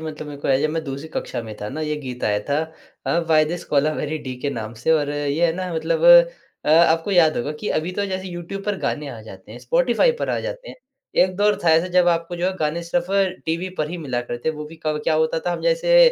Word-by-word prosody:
मतलब 155 Hz, -1 st, -6 dB
मेरे 145 Hz, -1 st, -8 dB
को -, -, -3 dB
हैं, 135 Hz, +3 st, +3 dB
मैं 165 Hz, +1 st, -1 dB
जब -, -, -13 dB
दूसरी 140 Hz, +3 st, -6 dB
कक्षा 125 Hz, -5 st, -4 dB
में 110 Hz, -1 st, -8 dB
था 105 Hz, -, -4 dB
ना, 150 Hz, +7 st, -5 dB
ये 150 Hz, -1 st, -2 dB
गीत 125 Hz, -3 st, -6 dB
आया 105 Hz, 0 st, +1 dB
था 145 Hz, +1 st, +2 dB, 0.5 s
अ, -, -, +2 dB
व्हाय 160 Hz, -2 st, +3 dB
दिस 170 Hz, +3 st, -4 dB
कोलावेरी 150 Hz, +1 st, 0 dB
डी 130 Hz, -3 st, -6 dB
के 145 Hz, -, -1 dB
नाम 115 Hz, -3 st, -5 dB
से 160 Hz, -, +3 dB
और 145 Hz, -2 st, +1 dB
ये 145 Hz, +3 st, +1 dB
है 165 Hz, -, +1 dB
ना 185 Hz, -2 st, -4 dB
मतलब 485 Hz, -, -1 dB, 0.6 s
अ, -, -, -2 dB
आपको 165 Hz, +3 st, +4 dB
याद 170 Hz, -5 st, +4 dB
होगा 145 Hz, +5 st, -2 dB
कि 210 Hz, -, -3 dB
अभी 165 Hz, +4 st, -4 dB
तो 200 Hz, +2 st, -1 dB
जैसे 190 Hz, -1 st, -4 dB
यूट्यूब 175 Hz, +3 st, -6 dB
पर 205 Hz, -1 st, -1 dB
गाने 150 Hz, -4 st, -2 dB
आ 120 Hz, -5 st, -8 dB
जाते 95 Hz, -1 st, -12 dB
हैं, 120 Hz, -, -9 dB
स्पॉटिफ़ाई 250 Hz, -, +2 dB
पर -, -, -1 dB
आ -, -, 0 dB
जाते -, -, -6 dB
हैं। -, -, -10 dB, 0.5 s
एक 185 Hz, 0 st, -4 dB
दौर 205 Hz, +1 st, +2 dB
था 165 Hz, -, +5 dB
ऐसा 165 Hz, +2 st, +4 dB
जब 180 Hz, -1 st, +4 dB
आपको 170 Hz, +1 st, 0 dB
जो 175 Hz, -, 0 dB
है 190 Hz, -, 0 dB
गाने 155 Hz, +2 st, -1 dB
सिर्फ 170 Hz, +1 st, -1 dB, 0.4 s
टीवी 170 Hz, +3 st, -1 dB
पर 150 Hz, -, 0 dB
ही 175 Hz, -, -4 dB
मिला 130 Hz, -7 st, -2 dB
करते 120 Hz, +3 st, -4 dB
थे, -, -, +3 dB
वो 150 Hz, -, -6 dB
भी 160 Hz, +2 st, -11 dB
कब 155 Hz, -1 st, -1 dB
क्या 160 Hz, -, +2 dB
होता 160 Hz, +1 st, +1 dB
था 175 Hz, -, +1 dB
हम -, -, -4 dB
जैसे -, -, +3 dB
160 Hz, 265 wpm, -22 LUFS, 145-175 Hz, 0.6 s, था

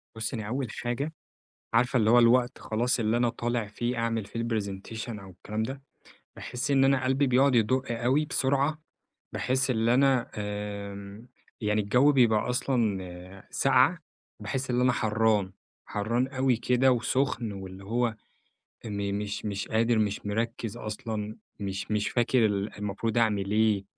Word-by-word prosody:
بُصي 110 Hz, +3 st, -3 dB
أنا 110 Hz, -, -4 dB
أول 125 Hz, +2 st, -2 dB
حاجة، 125 Hz, +8 st, -3 dB, 0.6 s
عارفة 125 Hz, +2 st, +3 dB
اللي 110 Hz, -3 st, +3 dB
هو 120 Hz, -, +7 dB
الوقت 120 Hz, +2 st, +4 dB
خلاص 120 Hz, +3 st, 0 dB
اللي 110 Hz, +1 st, +1 dB
أنا 120 Hz, 0 st, +2 dB
طالع 120 Hz, -1 st, -2 dB
فيه 120 Hz, +4 st, -3 dB
أعمل 115 Hz, -2 st, -1 dB
فيه 115 Hz, +3 st, -6 dB
الPresentation 110 Hz, 0 st, -4 dB
أو 95 Hz, -, -11 dB
الكلام 105 Hz, +4 st, -4 dB
ده، 135 Hz, +4 st, -5 dB, 0.5 s
باحس 125 Hz, +3 st, -4 dB
إن 135 Hz, -1 st, +4 dB
أنا 135 Hz, -1 st, +3 dB
قلبي 135 Hz, +2 st, +2 dB
بيقعد 130 Hz, +1 st, +4 dB
يدق 120 Hz, +3 st, +2 dB
أوي 125 Hz, +6 st, +1 dB
بسرعة، 140 Hz, +2 st, 0 dB, 0.5 s
باحس 130 Hz, +1 st, +1 dB
اللي 115 Hz, 0 st, +2 dB
أنا 135 Hz, -2 st, +3 dB
آمم، 105 Hz, +1 st, -6 dB, 0.3 s
يعني 105 Hz, 0 st, +1 dB
الجو 125 Hz, +8 st, +4 dB
بيبقى 120 Hz, -5 st, +3 dB
أصلًا 95 Hz, -8 st, -2 dB
ساقعة، 135 Hz, +6 st, +3 dB, 0.4 s
باحس 135 Hz, -3 st, -3 dB
اللي 125 Hz, 0 st, +2 dB
أنا 125 Hz, -, +4 dB
حرَّان. 110 Hz, -4 st, +1 dB, 0.3 s
حرَّان 115 Hz, +5 st, -1 dB
أوي 130 Hz, -1 st, +1 dB
كده 125 Hz, +3 st, +3 dB
وسخن، 125 Hz, -2 st, 0 dB
واللي 95 Hz, 0 st, -8 dB
هو 115 Hz, +2 st, 0 dB, 0.7 s
إني 100 Hz, -2 st, -3 dB
مش 105 Hz, 0 st, -3 dB
مش 100 Hz, -1 st, -3 dB
قادر، 115 Hz, +1 st, +2 dB
مش 105 Hz, -1 st, -1 dB
مركز 115 Hz, +1 st, -2 dB
أصلًا، 110 Hz, -1 st, -5 dB, 0.2 s
مش 100 Hz, +1 st, -4 dB
مش 105 Hz, -1 st, +1 dB
فاكر 120 Hz, -1 st, +3 dB
ال 100 Hz, 0 st, -2 dB
المفروض 105 Hz, +3 st, -2 dB
أعمل 105 Hz, -4 st, +1 dB
إيه 105 Hz, -2 st, +2 dB
115 Hz, 150 wpm, -28 LUFS, 105-125 Hz, 0.7 s, هو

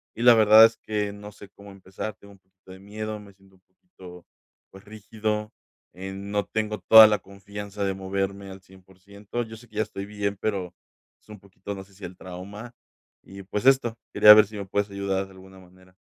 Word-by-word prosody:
y 115 Hz, -, -5 dB
la 120 Hz, -, +8 dB
verdad 110 Hz, 0 st, +7 dB
es 115 Hz, 0 st, 0 dB
que 105 Hz, -1 st, -4 dB
no 105 Hz, 0 st, -11 dB
sé 100 Hz, -, -14 dB
cómo 100 Hz, 0 st, -15 dB
empezar, 95 Hz, +2 st, -8 dB
tengo 100 Hz, 0 st, -17 dB
un 100 Hz, -, -21 dB
poquito 95 Hz, 0 st, -21 dB
de 95 Hz, -, -12 dB
miedo, 105 Hz, +2 st, -7 dB
me 100 Hz, -1 st, -15 dB
siento 95 Hz, 0 st, -25 dB
un 95 Hz, -, -29 dB
poquito, 95 Hz, -, -16 dB, 0.5 s
pues, 95 Hz, 0 st, -15 dB
rígido, 105 Hz, 0 st, -5 dB, 0.4 s
em, 95 Hz, +2 st, -8 dB
no 105 Hz, -1 st, -1 dB
tengo 110 Hz, -1 st, -3 dB
toda 110 Hz, 0 st, +9 dB
la 105 Hz, -1 st, 0 dB
confianza 100 Hz, +1 st, -8 dB
de 95 Hz, -1 st, -1 dB
moverme 95 Hz, +1 st, -4 dB
al 95 Hz, -, -12 dB
100%. 95 Hz, +4 st, -9 dB
Yo 110 Hz, 0 st, -11 dB
sé 120 Hz, +1 st, -17 dB
que 110 Hz, -, -21 dB
ya 110 Hz, -, +2 dB
estoy 100 Hz, -2 st, -8 dB
bien, 100 Hz, -1 st, -4 dB
pero 95 Hz, -4 st, -3 dB, 0.5 s
es -, -, -31 dB
un 105 Hz, -, -11 dB
poquito, 100 Hz, +1 st, -9 dB
no 95 Hz, -, -9 dB
sé, 100 Hz, +1 st, -23 dB
si 95 Hz, 0 st, -17 dB
el 90 Hz, +1 st, -10 dB
trauma, 100 Hz, +6 st, -10 dB, 0.5 s
y 95 Hz, 0 st, -12 dB
pues, 105 Hz, +4 st, -5 dB
esto, 130 Hz, -4 st, +3 dB, 0.2 s
quería 105 Hz, -, +9 dB
ver 105 Hz, -1 st, +5 dB
si 105 Hz, -1 st, -10 dB
me 100 Hz, -, -6 dB
puedes 100 Hz, +2 st, -2 dB
ayudar 100 Hz, -1 st, -3 dB
de 95 Hz, -, -18 dB
alguna 95 Hz, 0 st, -16 dB
manera. 95 Hz, 0 st, -21 dB
100 Hz, 215 wpm, -24 LUFS, 95-105 Hz, 0.5 s, toda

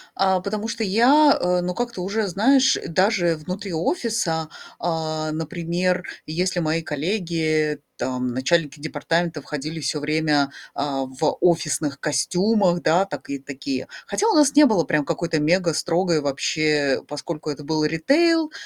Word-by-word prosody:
а, 190 Hz, -1 st, +2 dB
потому 210 Hz, +3 st, -4 dB
что 225 Hz, -, -3 dB
я, 260 Hz, +9 st, +5 dB
э, 180 Hz, 0 st, +1 dB
ну, 180 Hz, +1 st, -2 dB
как-то 235 Hz, -4 st, -3 dB
уже, 200 Hz, +3 st, -1 dB
знаешь, 260 Hz, +9 st, +3 dB
даже 180 Hz, -1 st, +2 dB
внутри 185 Hz, +5 st, -6 dB
офиса, 170 Hz, -, -1 dB, 0.3 s
а, 155 Hz, -2 st, -2 dB
например, 170 Hz, +3 st, -1 dB, 0.2 s
если 180 Hz, +3 st, -1 dB
мои 160 Hz, 0 st, 0 dB
коллеги, 155 Hz, -2 st, -1 dB, 0.2 s
там 125 Hz, -1 st, -2 dB
начальники 145 Hz, +3 st, 0 dB
департамента, 160 Hz, +2 st, -2 dB
входили 150 Hz, +3 st, -5 dB
всё 150 Hz, 0 st, -2 dB
время, 150 Hz, -1 st, +1 dB, 0.2 s
а, 140 Hz, -2 st, -2 dB
в 130 Hz, +4 st, -1 dB
офисных 155 Hz, -4 st, +1 dB
костюмах, 180 Hz, +3 st, +1 dB
да, 175 Hz, +5 st, +3 dB
такы 140 Hz, -7 st, -6 dB
такие. 135 Hz, -1 st, -4 dB, 0.2 s
Хотя 435 Hz, -, 0 dB
у 450 Hz, -, +3 dB
нас 290 Hz, -2 st, +4 dB
не 300 Hz, +1 st, +8 dB
было 215 Hz, -10 st, +3 dB
прям 150 Hz, +1 st, 0 dB
какой-то 165 Hz, 0 st, -1 dB
мегастрогой 170 Hz, +1 st, +1 dB
вообще, 145 Hz, 0 st, +1 dB
поскольку 150 Hz, +1 st, -5 dB
это 150 Hz, +1 st, -8 dB
был 155 Hz, +1 st, 0 dB
ритейл, 310 Hz, -, +2 dB
165 Hz, 140 wpm, -22 LUFS, 150-190 Hz, 0.3 s, не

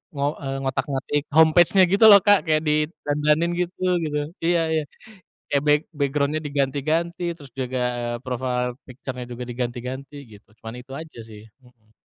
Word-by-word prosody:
ngo 140 Hz, 0 st, -1 dB
eee 135 Hz, -2 st, -4 dB
ngotak-ngatik 135 Hz, +2 st, -1 dB
home 160 Hz, 0 st, +7 dB
page-nya 175 Hz, +3 st, +5 dB
gitu 200 Hz, +3 st, +5 dB
loh, 200 Hz, -2 st, +9 dB
Kak, 205 Hz, -2 st, +6 dB
kayak 155 Hz, 0 st, +2 dB
didandanin 150 Hz, +1 st, 0 dB
gitu 180 Hz, +1 st, -4 dB, 0.2 s
gitu 150 Hz, -1 st, -2 dB, 0.2 s
iya 170 Hz, 0 st, +2 dB
iya, 160 Hz, -1 st, +1 dB, 0.7 s
kayak 140 Hz, -1 st, +1 dB
back 150 Hz, 0 st, +5 dB, 0.2 s
background-nya 145 Hz, +2 st, 0 dB
diganti-ganti 150 Hz, +5 st, -1 dB
terus 140 Hz, -4 st, -13 dB
juga, 130 Hz, -1 st, -3 dB, 0.2 s
eee, 120 Hz, 0 st, -3 dB
profile 125 Hz, -1 st, -2 dB
picture-nya 130 Hz, -1 st, -7 dB
juga 120 Hz, +1 st, -6 dB
diganti-ganti 125 Hz, +3 st, -5 dB, 0.2 s
gitu 105 Hz, 0 st, -17 dB
cuman 115 Hz, +1 st, -9 dB
itu 130 Hz, -, -26 dB
aja 160 Hz, -5 st, -11 dB
sih, 105 Hz, -1 st, -12 dB, 0.2 s
mhm. 115 Hz, -3 st, -25 dB
140 Hz, 155 wpm, -23 LUFS, 125-155 Hz, 0.7 s, loh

